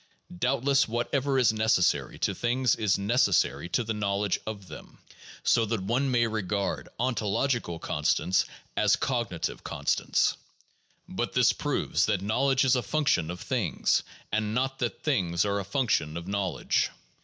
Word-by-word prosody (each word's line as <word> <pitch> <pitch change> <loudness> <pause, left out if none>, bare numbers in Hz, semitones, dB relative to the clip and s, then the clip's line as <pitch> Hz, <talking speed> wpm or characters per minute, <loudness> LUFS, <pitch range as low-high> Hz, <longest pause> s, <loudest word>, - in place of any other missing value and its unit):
Doubtless 135 +6 +2
whatever 135 +4 0
is 120 -4 +4
neces 110 -4 +2
sary - - 0
to - - 0
things 125 +1 +1
is 105 -3 +1
necessary 100 - +1
to 120 - +1
the 110 0 -2
knowledge 100 -1 -1
of 100 -3 -6
them; - - -11 0.5
so 115 - +3
that 110 -3 -2
one 125 +7 0
may 120 -2 +3
regard 105 -3 -2
ontological 120 -4 0
constants 80 +3 +1 0.3
as - - +4
cognitive 115 -10 -2
constants. - - 0 0.7
But - - -3
this - - +4
proves - - 0
that 95 - 0
knowledge 135 +6 +2
is 130 - +4
a 125 - +1
function 120 - +1
of 90 0 -6
things, 120 -10 0 0.3
and 110 0 -1
not 135 +1 -1
that 120 -2 -3
things 90 - +1
are 100 0 0
a - - -3
function 95 - 0
of 85 +1 -7
knowledge. 100 -3 0
110 Hz, 150 wpm, -28 LUFS, 100-125 Hz, 0.7 s, is